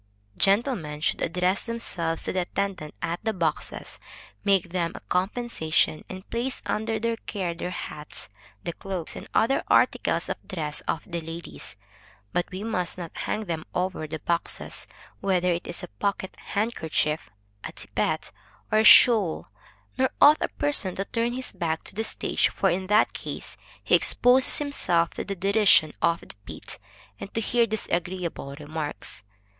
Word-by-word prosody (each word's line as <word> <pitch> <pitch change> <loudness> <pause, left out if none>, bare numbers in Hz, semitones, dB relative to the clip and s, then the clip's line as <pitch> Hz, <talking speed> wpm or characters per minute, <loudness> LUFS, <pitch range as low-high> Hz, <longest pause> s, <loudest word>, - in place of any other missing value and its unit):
Gentlemen 195 - +2
should - - 0
address 180 +3 +1
themselves 170 -8 -2
to - - -2
the 185 - +1
attendants 185 -4 -3
at 170 0 -1
the 220 0 0
boxes, 165 -5 -2 0.4
make 195 -3 +3
them 175 -2 0
a - - -6
compensation, 180 -5 0
and 185 +1 -8
place 245 +3 -1
under 220 +1 -1
their 230 +1 0
care 190 -6 -3
their 170 +1 -4
hats, 150 - -6 0.4
the 170 - -3
cloaks 185 -3 -4
and - - -8
other 250 +5 +3
articles - - +3
of - - -5
dress 155 -6 -3
of 160 - -1
the 170 -2 -4
ladies; 165 - -8 0.6
but 175 - 0
we 185 +2 -5
must 185 -7 -1
not 170 -3 -6
hang 215 0 -2
them 165 -3 -3
over 180 -3 -1
the 160 +1 -4
boxes, 170 +2 -2 0.3
whether 180 -2 +2
it 170 0 -2
is 175 - -6
a - - -4
pocket 190 - -3 0.2
handkerchief, 160 - 0 0.3
a - - -5
tippet, - - -2 0.4
or 215 - +5
a - - +4
shawl, 215 -6 +7
&c. 105 - -34 0.4
Nor 260 - +4
ought 300 +2 +8
a - - +2
person 285 -11 -1
to 195 - -2
turn 235 +1 -1
his 255 +1 -2
back 160 -2 -2
to - - -9
the 220 +3 -1
stage; - - +1
for - - +1
in 185 +2 -1
that 210 +2 +4
case, - - -6 0.3
he - - 0
exposes 250 +2 +6
himself 175 - +1
to - - -4
the 200 - -4
derision 185 -4 +5
of 170 0 +2
the - - -12
pit, - - -8 0.4
and 195 - -7
to - - +2
hear 235 +1 +2
disagreeable 175 -8 -2
remarks. 150 0 -5
185 Hz, 165 wpm, -26 LUFS, 165-220 Hz, 0.6 s, ought